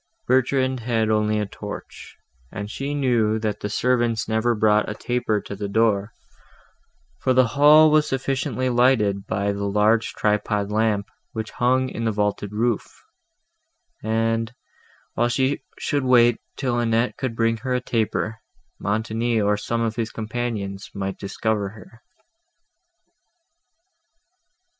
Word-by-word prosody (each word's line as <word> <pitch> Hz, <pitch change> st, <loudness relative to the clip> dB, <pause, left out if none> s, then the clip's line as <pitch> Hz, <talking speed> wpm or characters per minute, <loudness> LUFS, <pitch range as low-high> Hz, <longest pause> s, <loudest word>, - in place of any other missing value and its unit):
Bertrand 130 Hz, 0 st, +2 dB
had 115 Hz, -2 st, 0 dB
only 105 Hz, 0 st, +1 dB
a 105 Hz, -, 0 dB
torch, 100 Hz, -, -9 dB, 0.3 s
and 105 Hz, 0 st, -6 dB
she 140 Hz, +4 st, -3 dB
knew, 120 Hz, -6 st, +2 dB
that 110 Hz, -2 st, -2 dB
the 105 Hz, -, -4 dB
servants 120 Hz, -3 st, +1 dB
never 110 Hz, +2 st, +1 dB
brought 105 Hz, 0 st, +3 dB
a 105 Hz, -, -4 dB
taper 120 Hz, -3 st, -1 dB
to 100 Hz, -, -7 dB
the 100 Hz, +1 st, -4 dB
door, 105 Hz, 0 st, +1 dB, 1.1 s
for 130 Hz, -, +1 dB
the 130 Hz, -2 st, +4 dB
hall 150 Hz, +3 st, +6 dB
was 155 Hz, 0 st, +4 dB
sufficiently 135 Hz, -1 st, -1 dB
lighted 120 Hz, -6 st, +2 dB
by 100 Hz, 0 st, 0 dB
the 100 Hz, 0 st, -3 dB
large 105 Hz, +3 st, +2 dB
tripod 105 Hz, -1 st, 0 dB
lamp, 105 Hz, -2 st, +1 dB, 0.3 s
which 110 Hz, 0 st, -4 dB
hung 130 Hz, +1 st, +1 dB
in 115 Hz, -, -5 dB
the 110 Hz, -, +2 dB
vaulted 105 Hz, -1 st, -1 dB
roof; 115 Hz, +1 st, -2 dB, 1.0 s
and, 115 Hz, +1 st, 0 dB, 0.6 s
while 120 Hz, +1 st, +1 dB
she 130 Hz, +3 st, 0 dB, 0.2 s
should 145 Hz, -2 st, -1 dB
wait 120 Hz, -2 st, +4 dB, 0.2 s
till 125 Hz, -3 st, 0 dB
Annette 115 Hz, +1 st, +1 dB
could 130 Hz, -4 st, -3 dB
bring 115 Hz, 0 st, +1 dB
a 125 Hz, -1 st, 0 dB
taper, 110 Hz, -2 st, -2 dB, 0.4 s
Montoni, 110 Hz, +2 st, -1 dB
or 105 Hz, 0 st, +2 dB
some 115 Hz, +3 st, -2 dB
of 115 Hz, 0 st, -1 dB
his 115 Hz, -1 st, -1 dB
companions, 110 Hz, -4 st, -4 dB
might 95 Hz, -1 st, -4 dB
discover 100 Hz, 0 st, -2 dB
her. 110 Hz, +3 st, -15 dB
115 Hz, 135 wpm, -23 LUFS, 105-125 Hz, 1.1 s, hall